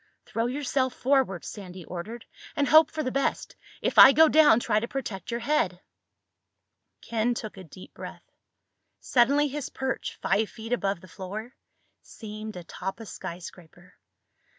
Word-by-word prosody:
"Throw 230 Hz, +1 st, -1 dB
yourself 260 Hz, -1 st, -1 dB
forward," 260 Hz, -9 st, +1 dB
Sandy 185 Hz, -4 st, -9 dB
ordered, 215 Hz, +7 st, -7 dB, 0.3 s
"and 285 Hz, -, +1 dB
hope 315 Hz, 0 st, +7 dB
for 310 Hz, -1 st, -3 dB
the 255 Hz, -, -2 dB
best. 275 Hz, +1 st, -1 dB, 0.3 s
If -, -, +2 dB
I 270 Hz, -, +11 dB
go 320 Hz, +2 st, +7 dB
down 300 Hz, -7 st, +6 dB
try 210 Hz, -3 st, +1 dB
to 235 Hz, -, -4 dB
protect 230 Hz, -8 st, -5 dB
your 235 Hz, 0 st, -3 dB
head." 230 Hz, -10 st, 0 dB, 1.2 s
Ken 235 Hz, +1 st, 0 dB
took 215 Hz, -2 st, -6 dB
a 190 Hz, -, -10 dB
deep 180 Hz, +2 st, -13 dB
breath. -, -, -10 dB, 0.7 s
Suddenly 280 Hz, +4 st, +3 dB
his 285 Hz, -1 st, -5 dB
perch, 265 Hz, 0 st, -4 dB
five 215 Hz, +1 st, +1 dB
feet 225 Hz, +1 st, -6 dB
above 200 Hz, -6 st, -1 dB
the 185 Hz, -, -14 dB
floor, 205 Hz, +7 st, -7 dB, 0.5 s
seemed 215 Hz, -1 st, -8 dB
atop 180 Hz, +3 st, -6 dB
a 225 Hz, -, -8 dB
skyscraper. 175 Hz, -2 st, -10 dB
225 Hz, 150 wpm, -27 LUFS, 190-265 Hz, 1.2 s, I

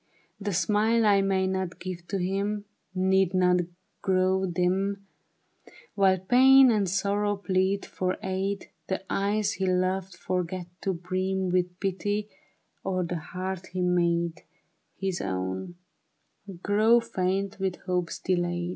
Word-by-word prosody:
" -, -, -41 dB
The -, -, +1 dB
smile 215 Hz, +4 st, +2 dB
I 200 Hz, -2 st, +5 dB
may 190 Hz, -1 st, +1 dB
not 190 Hz, -2 st, -2 dB
give 175 Hz, -2 st, -6 dB
to 200 Hz, -, -2 dB
him 200 Hz, +3 st, -1 dB, 0.3 s
Need 190 Hz, 0 st, +2 dB
not 180 Hz, -1 st, +4 dB, 0.4 s
grow 190 Hz, 0 st, +2 dB
dim 190 Hz, +3 st, 0 dB, 0.9 s
While 195 Hz, -2 st, +4 dB
pain 260 Hz, +6 st, +6 dB
and 205 Hz, -4 st, +1 dB
sorrow 205 Hz, +2 st, 0 dB
plead 190 Hz, 0 st, 0 dB
for 185 Hz, 0 st, -2 dB
aid; 190 Hz, +1 st, -2 dB, 0.2 s
The 190 Hz, 0 st, -3 dB
eyes 205 Hz, +1 st, +1 dB
he 190 Hz, -4 st, -2 dB
loved, 185 Hz, 0 st, 0 dB
forget 180 Hz, 0 st, -3 dB, 0.2 s
to 195 Hz, -, 0 dB
brim 185 Hz, +2 st, -2 dB
With 180 Hz, 0 st, 0 dB
pity, 205 Hz, +2 st, -2 dB, 0.5 s
or 185 Hz, -1 st, -1 dB
the 175 Hz, 0 st, -3 dB
heart 185 Hz, +3 st, -5 dB
he 185 Hz, -, -1 dB
made 170 Hz, -1 st, +1 dB, 0.5 s
His 190 Hz, -2 st, -2 dB
own, 95 Hz, -, -3 dB, 0.9 s
grow 215 Hz, +4 st, +4 dB
faint 195 Hz, -2 st, -2 dB
with 190 Hz, -2 st, -1 dB
hopes 180 Hz, -2 st, -2 dB
delayed." 175 Hz, -1 st, -1 dB
190 Hz, 130 wpm, -27 LUFS, 180-200 Hz, 0.9 s, pain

